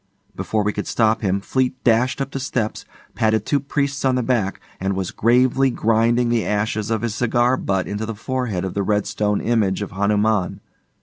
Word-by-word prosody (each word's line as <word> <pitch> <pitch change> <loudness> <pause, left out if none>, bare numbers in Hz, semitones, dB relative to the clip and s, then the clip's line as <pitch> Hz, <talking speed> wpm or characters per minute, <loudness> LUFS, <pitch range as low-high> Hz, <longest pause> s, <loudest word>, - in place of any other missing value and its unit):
Before 110 -1 -1
we 105 +1 0
could 105 - -4
stop 110 -1 +2
him, 100 -2 0
Fleete 130 +4 0
dashed 125 +3 +2
up 135 0 -3
the 135 - -4
steps, 125 -4 -2 0.3
patted 110 -1 +1
two 145 - +1
priests 140 0 -2
on 130 -1 +2
the 125 - 0
back, 115 -6 0 0.2
and 95 +1 -1
was 95 -2 -3
gravely 125 +3 +3
grinding 120 +1 +2
the 120 -2 +1
ashes 105 +1 -1
of 115 0 -1
his 115 -3 -1
cigar 120 +2 +2
butt 95 -6 -1
into 105 +2 -3
the 115 - -4
forehead 115 -5 -2
of 95 - -4
the 100 - -1
red 105 +1 +1
stone 105 -1 -1
image 105 -4 +1
of 100 - -7
Hanuman. 105 0 +1
110 Hz, 195 wpm, -21 LUFS, 105-125 Hz, 0.3 s, gravely